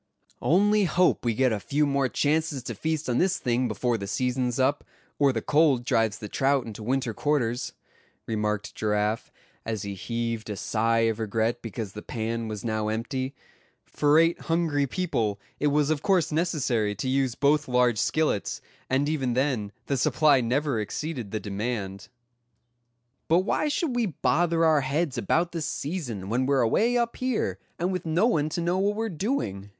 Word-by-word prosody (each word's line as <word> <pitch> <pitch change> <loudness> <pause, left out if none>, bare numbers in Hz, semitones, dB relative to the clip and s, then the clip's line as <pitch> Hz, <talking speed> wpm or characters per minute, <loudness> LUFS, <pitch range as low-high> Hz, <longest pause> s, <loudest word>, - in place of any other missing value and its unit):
"Only 205 +4 +3
hope 180 +1 +2
we 115 -2 0
get 130 +1 +3
a 105 - -1
few 145 +8 +1
more 140 -2 +1
chances 150 -2 0
to - - -4
feast 160 -1 -2
on 125 -1 +1
this 185 +1 +2
thing 125 0 0
before 115 +1 -1
the 100 - -5
season's 125 +2 -1
up, 130 +2 +2 0.4
or 140 -2 +5
the 115 -3 -3
cold 145 -5 +3
drives 110 -4 +1
the 105 - -7
trout 135 +4 +1
into 110 -1 -8
winter 125 +1 -1
quarters," 125 -3 -1 0.5
remarked 105 -1 -2
Giraffe, 105 +1 -1 0.3
as 110 -2 -3
he 100 -1 -4
heaved 115 +2 -3
a 105 - -3
sigh 115 +3 +1
of 115 -1 +1
regret 115 +2 -1
because 110 -2 -5
the 105 - -7
pan 115 0 -3
was 105 0 -6
now 110 -1 -1
empty—for 130 +5 -2
eight 165 +1 +3
hungry 160 -4 +1
people 115 - -1 0.2
it 150 - +2
was 145 +1 +2
of 150 -2 0
course 180 -5 +2
necessary 135 -10 0
to 105 - -4
use 130 -2 +1
both 150 +1 +2
large 125 -3 +2
skillets, 155 -9 0 0.3
and 135 +2 +2
even 135 -5 0
then 125 -6 0
the 140 - -1
supply 145 +1 +4
never 130 +1 0
exceeded 120 +1 -4
the 110 - -3
demand. 100 -1 -4 1.2
"But 170 +3 +4
why 220 +9 0
should 290 -2 -1
we 240 -3 +1
bother 165 +2 +1
our 155 -2 +4
heads 140 0 -1
about 170 - +1
the 165 - -4
season, 140 - -4
when 125 +5 0
we're 140 -2 +3
away 225 - +2
up 235 -1 -1
here, 255 -3 -1 0.2
and 175 +3 -1
with 180 -2 -2
no 165 +7 +3
one 155 -11 +2
to 170 - -3
know 175 +2 +1
what 205 +2 +1
we're 225 +1 -1
doing?" 155 - -3
130 Hz, 175 wpm, -26 LUFS, 115-160 Hz, 1.2 s, or